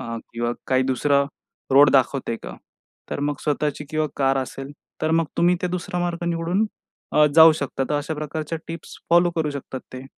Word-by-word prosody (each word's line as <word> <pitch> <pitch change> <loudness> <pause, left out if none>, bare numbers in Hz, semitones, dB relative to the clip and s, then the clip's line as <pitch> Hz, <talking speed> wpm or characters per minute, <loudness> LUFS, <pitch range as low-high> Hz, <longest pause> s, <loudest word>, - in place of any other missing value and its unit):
अ, 115 0 -5 0.2
किंवा 120 0 -1 0.2
काही 130 0 +3
दुसरा 140 +2 +2 0.5
रोड 140 +1 +7
दाखवतेय 130 -3 +1
का? - - -8 0.5
तर - - -3
मग 145 0 0
स्वतःची 150 0 -1
किंवा 155 0 0
कार 135 -1 +2
असेल, 135 +2 -8 0.3
तर 155 - +1
मग 165 0 +3
तुम्ही 175 +1 +4
ते - - +1
दुसरा 180 0 -3
मार्ग 175 -1 -2
निवडून 170 +5 0 0.5
अ, 150 - +6
जाऊ 160 0 +9
शकता. 140 -3 -3
तर - - +1
अशा 145 +2 -2
प्रकारच्या 155 +2 -4
टिप्स 165 0 -8
फॉलो 175 +1 +5
करू 155 -2 0
शकतात 135 -2 -6
ते. 130 0 -8
150 Hz, 185 wpm, -23 LUFS, 135-165 Hz, 0.5 s, जाऊ